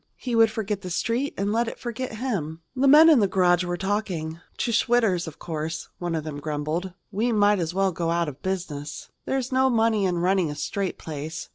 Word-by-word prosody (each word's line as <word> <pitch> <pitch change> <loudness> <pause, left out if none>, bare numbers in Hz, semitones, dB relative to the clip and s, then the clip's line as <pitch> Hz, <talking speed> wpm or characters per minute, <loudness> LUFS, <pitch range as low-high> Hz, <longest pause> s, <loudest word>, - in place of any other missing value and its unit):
He 245 -2 -3
would 225 -1 +6
forget 210 -2 -3
the 180 - -6
Street 230 +10 -1
and 200 +2 0
let 235 +1 +1
it - - -5
forget 240 0 -5
him. 170 - -3
The 265 +2 +2
men 305 +4 +9
in 310 -6 +7
the 205 - +3
garage 180 -2 +3
were 175 0 -2
talking. 185 -5 -2 0.2
"To 235 - -1
Schwitter's, 225 -7 +2
of 155 - -8
course," 160 -1 -4
one 175 -2 -2
of 160 - -2
them 150 -2 -6
grumbled. 155 +5 -3 0.2
"We 220 +4 0
might 205 -2 +4
as 170 0 -2
well 195 0 +2
go 165 -1 -2
out 170 0 +1
of 145 -1 -7
business." 155 -6 -4 0.2
"There's 265 -1 -1
no 260 0 +3
money 225 -4 +2
in 180 -2 0
running 180 -1 +2
a 150 - -5
straight 185 +6 -3
place. 155 +1 -6
190 Hz, 215 wpm, -25 LUFS, 165-225 Hz, 0.2 s, men